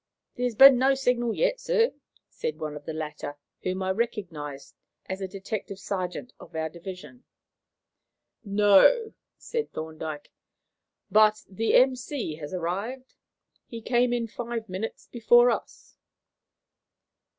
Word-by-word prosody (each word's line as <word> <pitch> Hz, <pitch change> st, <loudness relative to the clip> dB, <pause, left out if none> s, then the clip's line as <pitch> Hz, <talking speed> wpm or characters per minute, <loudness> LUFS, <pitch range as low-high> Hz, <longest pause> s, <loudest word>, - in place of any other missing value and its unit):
"There 250 Hz, -, -1 dB
has 245 Hz, -3 st, -1 dB
been 270 Hz, +1 st, +9 dB
no 270 Hz, +1 st, +4 dB
signal 245 Hz, -3 st, 0 dB
yet, -, -, +1 dB
sir," 485 Hz, -1 st, +2 dB, 0.4 s
said 155 Hz, -, -4 dB
one 155 Hz, -2 st, -5 dB
of 145 Hz, -1 st, -10 dB
the -, -, -4 dB
latter, 150 Hz, -2 st, -6 dB, 0.2 s
whom 185 Hz, +1 st, -2 dB
I 190 Hz, -, 0 dB
recognized 175 Hz, -, -4 dB, 0.3 s
as 190 Hz, +1 st, -5 dB
a 190 Hz, -, -2 dB
detective 195 Hz, +1 st, -6 dB
sergeant 190 Hz, +3 st, -4 dB
of -, -, -14 dB
our 160 Hz, 0 st, -1 dB
division. 185 Hz, +8 st, -10 dB, 1.2 s
"No," 205 Hz, -, +5 dB, 0.2 s
said 460 Hz, -1 st, -4 dB
Thorndyke, 155 Hz, -1 st, -6 dB, 0.8 s
"but 215 Hz, +1 st, +5 dB
the 220 Hz, +4 st, 0 dB
M.C. 255 Hz, -, +2 dB
has 150 Hz, -2 st, -7 dB
arrived. 200 Hz, +9 st, -4 dB, 0.5 s
He 230 Hz, -, -7 dB
came 240 Hz, +2 st, +2 dB
in 240 Hz, -1 st, 0 dB
five 230 Hz, 0 st, -5 dB
minutes 190 Hz, +4 st, -5 dB
before 240 Hz, +1 st, +4 dB
us." -, -, -6 dB
210 Hz, 130 wpm, -27 LUFS, 180-245 Hz, 1.2 s, been